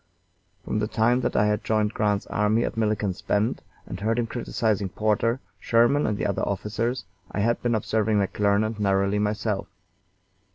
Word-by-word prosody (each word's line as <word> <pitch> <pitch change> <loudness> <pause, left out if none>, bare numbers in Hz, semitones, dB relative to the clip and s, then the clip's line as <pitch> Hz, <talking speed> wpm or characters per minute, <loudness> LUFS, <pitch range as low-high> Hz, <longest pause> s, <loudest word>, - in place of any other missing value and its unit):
From 105 - -1
the 105 - 0
time 120 +3 +2
that - - -1
I 105 - +4
had 105 0 0
joined 110 -1 +1
Grant's 105 -2 0
army 105 +3 +1
at - - -4
Milliken's 105 -4 -1
Bend 105 +3 0 0.2
and - - -7
heard 110 +2 0
him 120 - +1
criticising 110 -4 -1
Porter, 110 +5 +1 0.2
Sherman, 120 +7 +3
and 105 -1 -1
other 100 -2 0
officers, 110 +3 -2 0.3
I 100 - -1
had 115 +3 +1
been 120 -1 +1
observing 110 0 +1
McClernand 105 +2 +1
narrowly 100 0 +2
myself. 105 -1 -1
105 Hz, 160 wpm, -25 LUFS, 105-115 Hz, 0.3 s, I